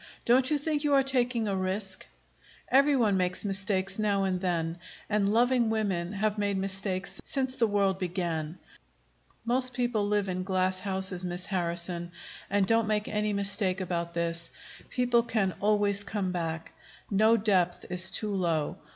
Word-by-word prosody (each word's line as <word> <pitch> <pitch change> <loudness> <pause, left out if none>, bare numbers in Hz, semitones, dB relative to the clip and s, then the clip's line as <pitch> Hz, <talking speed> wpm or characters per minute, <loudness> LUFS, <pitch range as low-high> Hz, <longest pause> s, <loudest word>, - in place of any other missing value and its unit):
"Don't 255 +2 +4
you 300 - +2
think 295 0 -1
you 290 -1 +3
are 270 - +5
taking 250 -4 +1
a 200 - -1
risk?" 190 - -2 0.6
"Every 280 +2 +4
one 215 -6 +2
makes 180 +2 +1
mistakes 195 0 -1
now 200 -2 +1
and 185 -1 -1
then, 170 -2 -1 0.3
and 205 -1 +1
loving 240 +1 +3
women 195 -5 -1
have 210 +1 -1
made 200 -1 0
mistakes 190 0 -2
since 260 -1 0
the 235 -3 +2
world 200 -2 +1
began. 170 -3 -3 0.9
Most 255 +1 +1
people 240 -4 0
live 205 -1 +1
in 185 0 -2
glass 185 0 0
houses, 190 -1 -1
Miss 180 0 -3
Harrison. 175 -1 -2 0.4
And 200 -1 +2
don't 225 +1 +2
make 210 -1 0
any 210 0 0
mistake 200 -1 +1
about 170 -2 -3
this: 170 0 +1 0.4
people 245 -1 +2
can 215 -5 -1
always 205 -1 +2
come 200 -3 -2
back. 165 -2 -4 0.4
No 220 +3 +4
depth 185 -5 +1
is 180 +1 +2
too 210 +2 +1
low. 170 -6 -1
195 Hz, 160 wpm, -28 LUFS, 185-220 Hz, 0.9 s, are